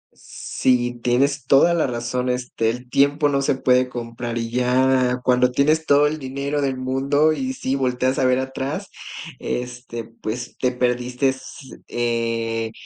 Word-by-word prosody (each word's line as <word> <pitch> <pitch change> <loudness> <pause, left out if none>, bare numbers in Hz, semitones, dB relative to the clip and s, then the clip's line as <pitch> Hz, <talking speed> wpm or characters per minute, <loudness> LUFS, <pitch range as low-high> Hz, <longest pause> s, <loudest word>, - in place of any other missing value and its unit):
Si 120 -1 -1
tienes 135 +2 +1
toda 170 +5 +5
la 165 -5 +1
razón, 125 +1 -2
este, 125 -2 -1
el 125 +2 -5
tiempo 145 +2 +3
no 140 -1 +1
se 140 0 +1
puede 125 -1 +2
comprar 120 -1 -5
y 115 0 -3
ya 125 0 +2
cuando 125 0 +3
tienes 155 +5 +2
todo 145 +1 +5
el 155 +1 -3
dinero 140 +2 -3
del 135 -2 -1
mundo 135 +4 +2
y 260 +9 -3
sí 135 - -2
volteas 130 0 0
a - - +2
ver 130 0 +3
atrás, 135 +1 -4 0.5
este, 125 -1 -5
pues, 115 +1 -6
te 125 -1 +1
perdiste, 125 +1 0
s 130 0 -8
eh, 115 -1 -1
125 Hz, 155 wpm, -22 LUFS, 120-135 Hz, 0.5 s, toda